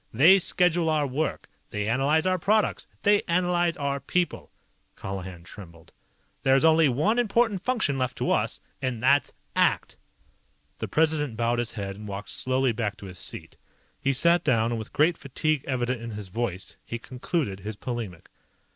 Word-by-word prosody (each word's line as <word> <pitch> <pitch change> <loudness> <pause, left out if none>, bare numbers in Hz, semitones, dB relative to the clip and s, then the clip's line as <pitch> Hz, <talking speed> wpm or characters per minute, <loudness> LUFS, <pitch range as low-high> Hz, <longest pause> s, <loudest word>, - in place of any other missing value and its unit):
They 165 - +7
schedule 175 -2 +2
our 155 -2 +2
work. 140 +4 -2 0.2
They 105 0 -3
analyze 140 +8 +2
our 185 0 +1
products. 210 +5 +1 0.2
They 205 0 +4
analyze 175 0 +1
our 140 -1 -1
people." 175 +6 -2 0.5
Colihan 95 -3 -6
trembled. 85 -3 -13 0.5
"There's 135 +3 +4
only 160 -2 +5
one 175 - +1
important 225 -4 +1
function 215 - 0
left 130 -1 -2
to - - 0
us. - - 0 0.2
And 125 -4 -3
that's 140 +2 +4 0.2
ACT!" - - +1 0.8
The - - -3
President 150 -6 +1
bowed 120 +1 +1
his 120 -1 -2
head 100 -2 -5
and 105 0 -9
walked 100 0 -6
slowly 130 0 +1
back 110 -2 -3
to 100 - -10
his 90 -2 -9
seat. - - -7 0.4
He 140 - +2
sat 170 +6 +4
down, 115 -6 +2
and 115 - -2
with 110 - -8
great 160 +3 +2
fatigue 145 +1 -1
evident 125 -2 -1
in 115 - -6
his 105 -3 -7
voice, 95 -3 -4
he 115 - -5
concluded 125 - -3
his 105 +2 -6
polemic. 110 -7 -6
130 Hz, 165 wpm, -26 LUFS, 110-165 Hz, 0.8 s, They